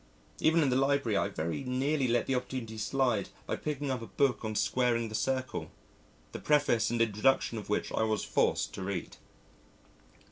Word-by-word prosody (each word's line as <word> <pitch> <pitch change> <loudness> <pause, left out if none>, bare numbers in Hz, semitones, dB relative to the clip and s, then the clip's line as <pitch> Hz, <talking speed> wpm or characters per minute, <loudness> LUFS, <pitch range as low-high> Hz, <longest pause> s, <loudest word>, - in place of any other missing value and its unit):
_ - - -13
Even 160 +1 +4
in 135 - +2
the - - +2
Library 135 -4 +2
I 100 - +2
very 85 - -3
nearly 135 +2 0
let 120 0 +2
the 135 - 0
opportunity 125 -3 -3
slide 120 -2 0 0.2
by - - -2
picking 145 -2 -3
up 125 -2 -2
a 115 - -7
book 125 +2 +1
on 110 -1 -3
squaring 120 -1 +1
the - - -9
circle, 130 +3 -2 0.6
the - - -6
preface 145 -6 +2
and 120 0 -1
introduction 115 +1 +2
of 105 - -10
which 105 - -1
I - - 0
was 110 -2 0
forced - - +1
to - - -6
read. 95 -2 -4
125 Hz, 185 wpm, -31 LUFS, 110-135 Hz, 0.6 s, Even